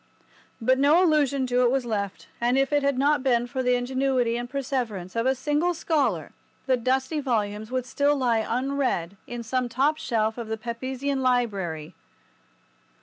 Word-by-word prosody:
But 260 Hz, +3 st, +2 dB
no 300 Hz, +6 st, +5 dB
allusion 285 Hz, -5 st, +2 dB
to 250 Hz, 0 st, +1 dB
it 245 Hz, -, +4 dB
was 260 Hz, 0 st, 0 dB
left, 200 Hz, -4 st, -3 dB
and 245 Hz, +2 st, +2 dB
if 270 Hz, +1 st, +1 dB
it 290 Hz, -, +3 dB
had 280 Hz, -2 st, +1 dB
not 290 Hz, +2 st, +3 dB
been 245 Hz, -3 st, +2 dB
for 260 Hz, +2 st, -3 dB
the 250 Hz, -1 st, +2 dB
ingenuity 255 Hz, -1 st, 0 dB
and 240 Hz, 0 st, -4 dB
perseverance 245 Hz, -9 st, -3 dB
of 230 Hz, +2 st, +1 dB
a 265 Hz, -, +3 dB
single 295 Hz, +6 st, 0 dB
scholar 315 Hz, -3 st, 0 dB, 0.3 s
the 260 Hz, -, +3 dB
dusty 260 Hz, +5 st, 0 dB
volumes 215 Hz, -5 st, -1 dB
would 255 Hz, -1 st, -2 dB
still 285 Hz, +3 st, +1 dB
lie 245 Hz, -5 st, +2 dB
unread 250 Hz, -6 st, -1 dB
in 240 Hz, -1 st, -5 dB
some 250 Hz, +2 st, -1 dB
top 285 Hz, +6 st, +1 dB
shelf 220 Hz, -3 st, -1 dB
of 235 Hz, -, -5 dB
the 220 Hz, 0 st, -3 dB
Pepysian 260 Hz, +4 st, -3 dB
Library. 195 Hz, -11 st, -1 dB
255 Hz, 170 wpm, -25 LUFS, 230-275 Hz, 0.3 s, no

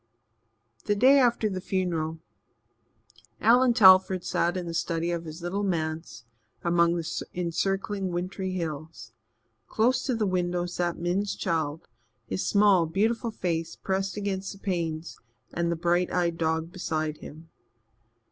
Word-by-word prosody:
The 205 Hz, -, +1 dB
day 265 Hz, +7 st, +6 dB
after 240 Hz, -3 st, +3 dB
the 190 Hz, -3 st, -4 dB
funeral, 170 Hz, -4 st, -2 dB, 1.2 s
Allan 240 Hz, +2 st, +5 dB
Telford 190 Hz, -3 st, +6 dB
sat 175 Hz, +2 st, 0 dB
in 180 Hz, -, -4 dB
the 170 Hz, -, -5 dB
study 165 Hz, 0 st, -1 dB
of 170 Hz, -1 st, -3 dB
his 160 Hz, +2 st, -9 dB
little 185 Hz, +4 st, -2 dB
manse 160 Hz, -, -3 dB, 0.4 s
among 170 Hz, 0 st, +3 dB
the 165 Hz, -2 st, -3 dB, 0.3 s
encircling 195 Hz, +3 st, -1 dB
wintry 185 Hz, +2 st, -3 dB
hills. 155 Hz, -8 st, -5 dB, 0.6 s
Close 240 Hz, +4 st, +2 dB
to 255 Hz, -, 0 dB
the 220 Hz, -2 st, 0 dB
window 180 Hz, -2 st, 0 dB
sat 175 Hz, -1 st, -2 dB
Min's 185 Hz, +4 st, -1 dB
child, 160 Hz, -3 st, -2 dB, 0.4 s
his 95 Hz, -5 st, -3 dB
small, 200 Hz, -5 st, +4 dB
beautiful 225 Hz, +7 st, 0 dB
face 165 Hz, -5 st, -3 dB
pressed 195 Hz, +1 st, -2 dB
against 195 Hz, -1 st, -3 dB
the -, -, -13 dB
panes, 170 Hz, -4 st, -3 dB, 0.3 s
and 170 Hz, 0 st, 0 dB
the -, -, 0 dB
bright 175 Hz, +1 st, +1 dB
eyed 170 Hz, -2 st, 0 dB
dog 160 Hz, 0 st, -1 dB
beside 155 Hz, -4 st, -3 dB
him. 160 Hz, +2 st, -12 dB
175 Hz, 140 wpm, -27 LUFS, 165-195 Hz, 1.2 s, day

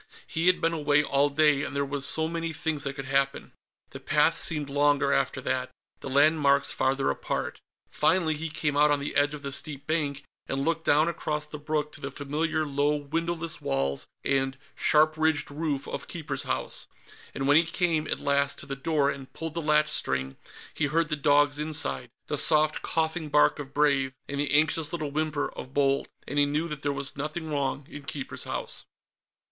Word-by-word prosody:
He 165 Hz, +2 st, -1 dB
had 185 Hz, -, +5 dB
been 165 Hz, 0 st, +2 dB
away 150 Hz, -2 st, +3 dB
all 140 Hz, 0 st, +2 dB
day, 145 Hz, -1 st, +3 dB
and 145 Hz, -, -4 dB
there 140 Hz, 0 st, +1 dB
were 140 Hz, 0 st, -4 dB
so 160 Hz, +3 st, +1 dB
many 165 Hz, 0 st, -3 dB
things 155 Hz, -1 st, -2 dB
that 140 Hz, 0 st, -3 dB
could 135 Hz, -, -6 dB
happen. 135 Hz, +1 st, 0 dB, 0.4 s
The -, -, -8 dB
path -, -, +3 dB
seemed 150 Hz, -3 st, -1 dB
longer, 145 Hz, 0 st, +2 dB
after -, -, 0 dB
that; 130 Hz, 0 st, -1 dB, 0.3 s
the -, -, -6 dB
landmarks 140 Hz, 0 st, +4 dB
farther 135 Hz, +1 st, +1 dB
apart. -, -, -4 dB, 0.3 s
Finally, 170 Hz, -4 st, +2 dB
he 160 Hz, +1 st, -3 dB
came 150 Hz, -1 st, -1 dB
out 150 Hz, +1 st, +5 dB
on 145 Hz, -1 st, +2 dB
the 140 Hz, -, -4 dB
edge 145 Hz, +1 st, +3 dB
of 145 Hz, -, -10 dB
the 140 Hz, -, -4 dB
steep 140 Hz, 0 st, -3 dB
bank, 145 Hz, -3 st, -1 dB, 0.2 s
and 135 Hz, +1 st, -2 dB
looked 165 Hz, 0 st, 0 dB
down 150 Hz, +3 st, +4 dB
across 150 Hz, -3 st, -2 dB
the 150 Hz, 0 st, -9 dB
brook 150 Hz, 0 st, -2 dB
to -, -, -11 dB
the -, -, -4 dB
familiar 155 Hz, +2 st, -1 dB
low 145 Hz, +1 st, +1 dB
windowless 165 Hz, +3 st, -3 dB
walls 70 Hz, 0 st, -1 dB, 0.2 s
and 135 Hz, -1 st, +1 dB, 0.2 s
sharp 155 Hz, +1 st, +3 dB
ridged 155 Hz, -2 st, +1 dB
roof 145 Hz, -2 st, -2 dB
of -, -, -5 dB
Keeper's 165 Hz, -4 st, -3 dB
House; -, -, -3 dB, 0.5 s
and 135 Hz, -, -1 dB
when 145 Hz, +1 st, +6 dB
he 165 Hz, -, +6 dB
came, 160 Hz, -2 st, 0 dB
at -, -, -2 dB
last, 140 Hz, 0 st, +1 dB
to -, -, -8 dB
the 135 Hz, -, -4 dB
door, 145 Hz, 0 st, +1 dB
and 135 Hz, -1 st, -9 dB
pulled 165 Hz, -1 st, -5 dB
the 170 Hz, -, -2 dB
latchstring, 150 Hz, -, +1 dB, 0.4 s
he 150 Hz, -, 0 dB
heard 160 Hz, +2 st, +1 dB
the 150 Hz, -, 0 dB
dogs 145 Hz, 0 st, +3 dB
inside 150 Hz, -5 st, -1 dB, 0.2 s
the 150 Hz, -, -2 dB
soft, 155 Hz, 0 st, +3 dB
coughing 160 Hz, -1 st, -1 dB
bark 150 Hz, +1 st, +4 dB
of 140 Hz, -1 st, -7 dB
Brave, 140 Hz, -2 st, +2 dB
and 140 Hz, 0 st, -4 dB
the 145 Hz, -1 st, 0 dB
anxious 155 Hz, +1 st, +3 dB
little 155 Hz, -4 st, -3 dB
whimper 155 Hz, -1 st, -1 dB
of 130 Hz, -, -9 dB
Bold 140 Hz, -1 st, +2 dB, 0.2 s
and 145 Hz, +2 st, -1 dB
he 145 Hz, -, +4 dB
knew 150 Hz, +3 st, -1 dB
that 150 Hz, -2 st, -4 dB
there 145 Hz, -, 0 dB
was 140 Hz, -1 st, -2 dB
nothing 155 Hz, +3 st, -4 dB
wrong 140 Hz, -1 st, -1 dB
in 145 Hz, -, -9 dB
Keeper's 140 Hz, -2 st, -6 dB
House. -, -, -5 dB
145 Hz, 195 wpm, -27 LUFS, 140-155 Hz, 0.5 s, when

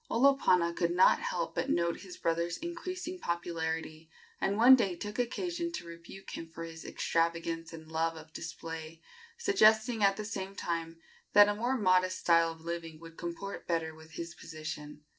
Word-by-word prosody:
Olopana 230 Hz, -10 st, +4 dB
could 170 Hz, -, +1 dB
not 180 Hz, +2 st, +5 dB
help -, -, -2 dB
but 270 Hz, -, -2 dB
note 170 Hz, -7 st, +1 dB
his 185 Hz, -2 st, -10 dB
brother's 170 Hz, +1 st, 0 dB
increasing 360 Hz, +2 st, -5 dB
popularity, 160 Hz, -, -3 dB, 0.3 s
and 200 Hz, +1 st, +1 dB
one 245 Hz, +4 st, +9 dB
day 200 Hz, -8 st, 0 dB
took 205 Hz, +6 st, -6 dB
occasion 340 Hz, +8 st, -2 dB
to 330 Hz, -, -5 dB
rebuke 170 Hz, +3 st, -10 dB
him 165 Hz, -, -7 dB
for 165 Hz, +1 st, -7 dB
his 165 Hz, -1 st, -8 dB
extravagance 165 Hz, 0 st, -1 dB
and 160 Hz, -1 st, -10 dB
love 165 Hz, +1 st, 0 dB
of 160 Hz, 0 st, -12 dB
display, 165 Hz, -1 st, -7 dB, 0.4 s
suggesting, 225 Hz, -, +4 dB
at 195 Hz, 0 st, +4 dB
the 215 Hz, -, -4 dB
same 195 Hz, -2 st, -5 dB
time, 165 Hz, -2 st, -3 dB, 0.3 s
that 205 Hz, 0 st, +9 dB
a -, -, +2 dB
more 240 Hz, +5 st, 0 dB
modest 185 Hz, -3 st, +3 dB
style 165 Hz, -1 st, +4 dB
of 165 Hz, 0 st, -12 dB
living 165 Hz, -1 st, -5 dB
would 165 Hz, 0 st, -12 dB
comport 175 Hz, +4 st, -6 dB
better 165 Hz, -2 st, -1 dB
with 160 Hz, 0 st, -15 dB
his 170 Hz, +1 st, -6 dB
position. 155 Hz, -2 st, -8 dB
170 Hz, 170 wpm, -31 LUFS, 165-210 Hz, 0.4 s, one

